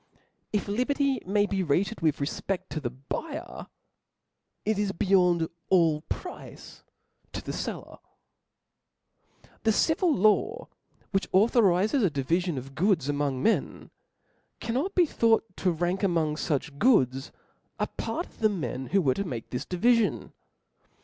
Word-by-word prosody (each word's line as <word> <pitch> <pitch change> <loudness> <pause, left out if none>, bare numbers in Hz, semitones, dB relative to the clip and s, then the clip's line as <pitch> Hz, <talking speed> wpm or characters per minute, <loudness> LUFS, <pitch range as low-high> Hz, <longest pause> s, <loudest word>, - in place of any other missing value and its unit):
If 210 -1 -1
liberty 265 +4 0
may 205 +1 +3
be 195 -2 -1
rated 185 +7 0
with 155 -2 +2
refpe£fc 175 +6 -2
CO 155 - -2
the 130 -5 -3
buyer* 280 - -6 1.0
it 215 -1 +1
is 205 -1 0
beyond 180 -3 +3 0.2
all 165 -5 +3
price 360 - -8 0.5
to - - -4
the - - -4
fellen - - -6 1.6
The 225 - +3
civil 320 - +2
law^ 215 - +2 0.4
which 195 -1 -1
authorizes 210 +2 +3
a 195 - +3
divifion 160 +4 -1
of 135 +2 -7
goods 165 -3 +1
among 145 -3 -1
men, 225 - 0 0.7
cannot 270 +12 -2
be 360 - +5
thought 230 -6 +2
to 185 - +1
rank 175 +3 -1
among 165 -6 +1
fu<th 145 -2 -2
goodS) 135 - +3 0.5
a - - 0
part 345 - -4
of - - -21
the 215 - +4
men 140 -9 -4
who 195 -1 +2
were 130 -3 +3
to 200 - -2
make 125 - -6
this 125 - -4
divifion. 230 +4 +1
190 Hz, 135 wpm, -27 LUFS, 155-225 Hz, 1.6 s, be